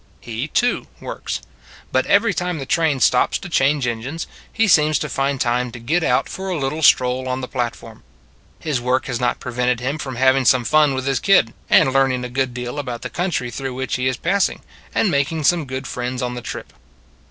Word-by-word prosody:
He, 120 +4 -5
too, 245 +8 0
works. - - -5 0.5
But 130 - +1
every 205 +1 +4
time 180 -1 -2
the 135 - -5
train 155 -2 +1
stops 125 - +3
to 195 - -9
change 140 -4 +2
engines, 120 +7 -3 0.3
he 225 0 +2
seems 155 -4 +4
to - - -3
find 135 0 -1
time 125 0 0
to 120 - -8
get 160 +9 0
out 125 -4 +2
for 190 0 -6
a 180 - -1
little 145 +2 -2
stroll 130 -2 +4
on 130 +1 -2
the 125 - -4
platform. 120 -3 -5 0.6
His 145 -6 -2
work 125 +1 0
has 125 -3 -3
not 120 0 0
pre 125 - -6
vented 125 0 +1
him 135 +5 -3
from 130 -3 -5
having 130 +1 +3
some 125 0 +4
fun 150 -1 +4
with 130 0 -3
his 135 -1 +1
kid, 180 - +4 0.2
and 130 - +5
learning 135 -2 +2
a - - -5
good 130 +1 -1
deal 125 +3 -5
about 125 -4 -5
the 125 - -5
country 170 -9 -2
through 130 +1 -5
which 130 0 -2
he 130 0 0
is 130 - 0
passing, 195 +3 0 0.3
and 205 - +2
making 145 +2 0
some 170 +1 +3
good 130 0 -5
friends 125 +1 -3
on 125 0 -2
the 125 - -6
trip. - - -7
130 Hz, 215 wpm, -20 LUFS, 125-155 Hz, 0.6 s, and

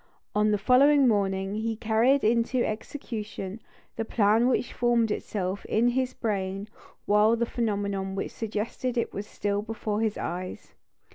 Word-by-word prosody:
On 210 +1 +3
the 210 - +2
following 270 +6 +5
morning 195 -3 +1
he 220 +1 -2
carried 225 +5 +2
into 235 +3 +2
execution 215 -3 -5 0.4
the 225 - 0
plan 220 +2 +3
which 250 -1 0
formed 235 -2 +2
itself 195 -2 -3
in 235 +3 +2
his 255 +1 -1
brain 195 -2 -2 0.4
while 210 +2 +4
the 235 0 0
phenomenon 200 -4 -2
which 195 - -3
suggested 230 +3 -3
it 235 - -1
was 205 +1 -5
still 205 -1 -2
before 215 -1 -3
his 220 -2 0
eyes. 180 +1 -5
215 Hz, 145 wpm, -27 LUFS, 200-235 Hz, 0.4 s, following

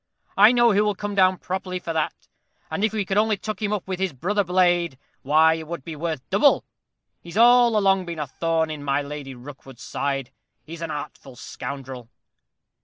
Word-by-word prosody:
I 205 +3 +7
know 240 -1 +4
who 205 +1 +3
will 210 -1 0
come 205 +1 -5
down 185 -1 +4
properly 185 0 -4
for 170 -2 -5
that; 160 -1 -3 0.4
and 200 - -2
if 215 - +2
we 215 -2 -2
could 195 +2 +1
only 215 -1 +2
tuck 215 0 -6
him 210 -1 -1
up 210 -3 -3
with 185 -1 -4
his 190 -4 -1
brother 200 +10 0
blade, 175 -4 +2 0.2
why 155 +3 +4
it 160 -1 -6
would 170 -4 -6
be 165 - -6
worth 160 -3 -4
double. - - +4 0.6
He's 170 +3 -9
all 240 -1 +6
along 195 -3 +2
been 170 -1 -5
a 150 - -2
thorn 160 +3 -1
in 150 -2 -6
my 140 0 0
Lady 140 -2 -7
Rookwood's 130 0 -12
side; 135 -2 -3 0.3
he's 165 +1 -9
an 165 - -4
artful 145 -3 -7
scoundrel." 130 -2 -8
170 Hz, 195 wpm, -23 LUFS, 145-200 Hz, 0.6 s, I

